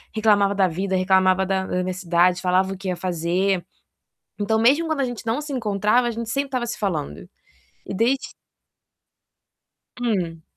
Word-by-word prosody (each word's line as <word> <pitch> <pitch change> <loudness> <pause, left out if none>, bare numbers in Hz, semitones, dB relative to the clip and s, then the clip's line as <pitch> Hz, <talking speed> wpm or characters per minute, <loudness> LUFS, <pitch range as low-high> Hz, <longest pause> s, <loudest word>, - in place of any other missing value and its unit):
reclamava 205 -2 +3
da 195 -2 +3
vida, 190 +3 -2
reclamava 185 0 +3
da 190 0 -1
universidade, 180 -1 +1
falava 185 +1 +1
o - - -8
que 195 +1 -7
ia 180 - -1
fazer. 180 +1 -1 0.7
Então, 220 +2 +1
mesmo 275 +9 +4
quando 315 -3 -1
a - - +2
gente 245 -2 -6
não 230 +5 0
se 295 -2 -6
encontrava, 215 +1 +1
a - - 0
gente 230 0 -5
sempre 275 +4 -1
estava 255 -2 -2
se 240 - -5
falando. 165 - -3 0.7
E - - -7
desde 240 +7 0 1.7
Hum. 180 -9 -2
195 Hz, 160 wpm, -22 LUFS, 185-230 Hz, 1.7 s, mesmo